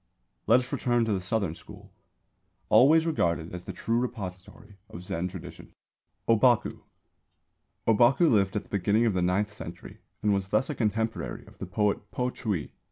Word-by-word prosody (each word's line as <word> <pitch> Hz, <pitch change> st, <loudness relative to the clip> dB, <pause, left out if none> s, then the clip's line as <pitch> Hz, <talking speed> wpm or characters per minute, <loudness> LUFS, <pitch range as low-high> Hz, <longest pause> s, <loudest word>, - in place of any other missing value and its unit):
Let 120 Hz, +4 st, +6 dB
us 125 Hz, +2 st, -8 dB
return 120 Hz, -3 st, +1 dB
to 110 Hz, -, 0 dB
the 95 Hz, -, -1 dB
Southern 95 Hz, -2 st, -1 dB
School, -, -, -14 dB, 0.8 s
always 150 Hz, +9 st, +6 dB
regarded 85 Hz, -, 0 dB
as 90 Hz, 0 st, -7 dB
the -, -, -5 dB
true 115 Hz, +6 st, -1 dB
repository 105 Hz, -3 st, -7 dB
of 90 Hz, -, -9 dB
Zen 90 Hz, -2 st, -3 dB
tradition. 90 Hz, -1 st, -10 dB, 0.5 s
ŌBAKU. 115 Hz, +1 st, +3 dB, 1.1 s
Ōbaku 120 Hz, +6 st, +4 dB
lived 100 Hz, -3 st, +2 dB
at 105 Hz, -, -1 dB
the -, -, -24 dB
beginning 100 Hz, +4 st, +2 dB
of 110 Hz, -, +2 dB
the 90 Hz, -, 0 dB
ninth 100 Hz, +4 st, 0 dB
century, 85 Hz, -3 st, -10 dB, 0.2 s
and 105 Hz, -1 st, +3 dB
was 100 Hz, -1 st, -1 dB
thus 110 Hz, +9 st, +1 dB
a -, -, -2 dB
contemporary 110 Hz, -2 st, -2 dB
of -, -, -18 dB
the -, -, -5 dB
poet 105 Hz, +1 st, -1 dB
Po 125 Hz, 0 st, -2 dB
Chü 100 Hz, -12 st, -2 dB
i. -, -, -15 dB
105 Hz, 170 wpm, -27 LUFS, 95-120 Hz, 1.1 s, Let